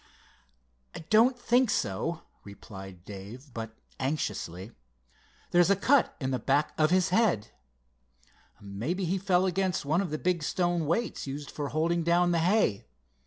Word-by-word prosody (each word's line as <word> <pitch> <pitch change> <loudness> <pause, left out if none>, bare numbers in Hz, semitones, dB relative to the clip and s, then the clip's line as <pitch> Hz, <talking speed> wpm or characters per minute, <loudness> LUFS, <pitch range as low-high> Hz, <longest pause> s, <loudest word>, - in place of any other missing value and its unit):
"I - - -6
don't 235 +4 +5
think 245 0 +2
so," 165 - -1 0.2
replied 95 -3 -11
Dave, 105 +7 -10
but 115 -1 -7 0.2
anxiously. 105 - -3 0.8
"There's 175 +1 +4
a 200 - +5
cut 255 +7 +3
in 130 -3 -2
the 130 - -1
back 140 +6 +1
of 155 0 +3
his 185 +1 +3
head." 185 - +2 1.1
"Mebbe 100 - -4
he 185 +1 0
fell 185 -1 +2
against 185 -3 0
one 155 +6 +2
of 195 - -3
the 155 - -2
big 180 0 0
stone 175 +1 0
weights 190 0 -1
used 140 +1 -6
for 145 -2 -4
holding 170 +3 0
down 175 +1 +3
the 170 - +2
hay. 165 - +1
165 Hz, 150 wpm, -28 LUFS, 120-185 Hz, 1.1 s, don't